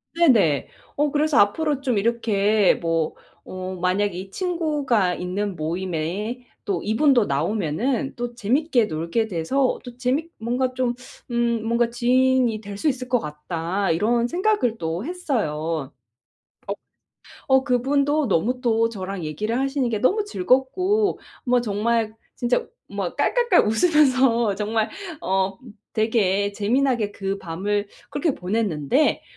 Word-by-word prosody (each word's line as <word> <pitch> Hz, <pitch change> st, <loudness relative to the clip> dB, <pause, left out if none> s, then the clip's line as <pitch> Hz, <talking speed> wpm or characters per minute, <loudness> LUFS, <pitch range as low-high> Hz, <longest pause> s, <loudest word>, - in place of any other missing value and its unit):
네네. 225 Hz, -, +4 dB, 0.3 s
어 295 Hz, +1 st, +2 dB
그래서 300 Hz, 0 st, +2 dB
앞으로 280 Hz, +8 st, +2 dB
좀 255 Hz, -5 st, 0 dB
이렇게 210 Hz, -2 st, +2 dB
뭐 165 Hz, -2 st, -1 dB, 0.3 s
어 185 Hz, 0 st, -6 dB
만약에 185 Hz, +1 st, +1 dB
이 190 Hz, +1 st, -6 dB
친구가 295 Hz, -, 0 dB
있는 190 Hz, +2 st, -3 dB
모임에 180 Hz, +8 st, -3 dB, 0.2 s
또 195 Hz, -6 st, -2 dB
이분도 245 Hz, +1 st, +3 dB
나오면은 205 Hz, -, -1 dB
또 240 Hz, 0 st, -5 dB
재밌게 245 Hz, +2 st, +2 dB
놀게 165 Hz, +7 st, -1 dB
돼서 220 Hz, +10 st, 0 dB
또 245 Hz, -1 st, -10 dB
재밌 270 Hz, +6 st, -1 dB
뭔가 250 Hz, +3 st, -1 dB
좀 255 Hz, -1 st, 0 dB, 0.4 s
음 235 Hz, -2 st, +1 dB
뭔가 235 Hz, +1 st, +2 dB
'지인이 250 Hz, -1 st, +2 dB
될 200 Hz, -1 st, -8 dB
수 310 Hz, -, -1 dB
있을 255 Hz, -2 st, -1 dB
것 250 Hz, -, +3 dB
같다.' 165 Hz, +4 st, -3 dB
이런 235 Hz, +8 st, +2 dB
생각을 350 Hz, -, +1 dB
또 165 Hz, +3 st, -3 dB
했어요. 165 Hz, -, -2 dB, 0.8 s
어. -, -, -2 dB, 0.7 s
어 265 Hz, 0 st, +4 dB
그분도 280 Hz, +3 st, +1 dB
너무 230 Hz, +7 st, +1 dB
또 230 Hz, -2 st, +2 dB
저랑 195 Hz, -3 st, -5 dB
얘기를 215 Hz, +10 st, -2 dB
하시는 270 Hz, -1 st, 0 dB
게 215 Hz, -3 st, -2 dB
너무 405 Hz, -, +2 dB
즐겁고 370 Hz, +4 st, +1 dB, 0.2 s
뭐 250 Hz, -2 st, +3 dB
정말 220 Hz, 0 st, 0 dB, 0.2 s
진짜 245 Hz, -, 0 dB, 0.2 s
뭐 -, -, -4 dB
깔깔깔 480 Hz, -7 st, +3 dB
웃으면서 255 Hz, -, +3 dB
정말 215 Hz, +1 st, -1 dB, 0.3 s
어 190 Hz, 0 st, 0 dB, 0.4 s
되게 205 Hz, -3 st, +1 dB
재미나게 230 Hz, 0 st, +1 dB
그 195 Hz, 0 st, -3 dB
밤을 200 Hz, +5 st, -2 dB, 0.2 s
그렇게 290 Hz, 0 st, 0 dB
보냈는데 190 Hz, -, 0 dB
230 Hz, 255 characters per minute, -23 LUFS, 195-260 Hz, 0.8 s, 네네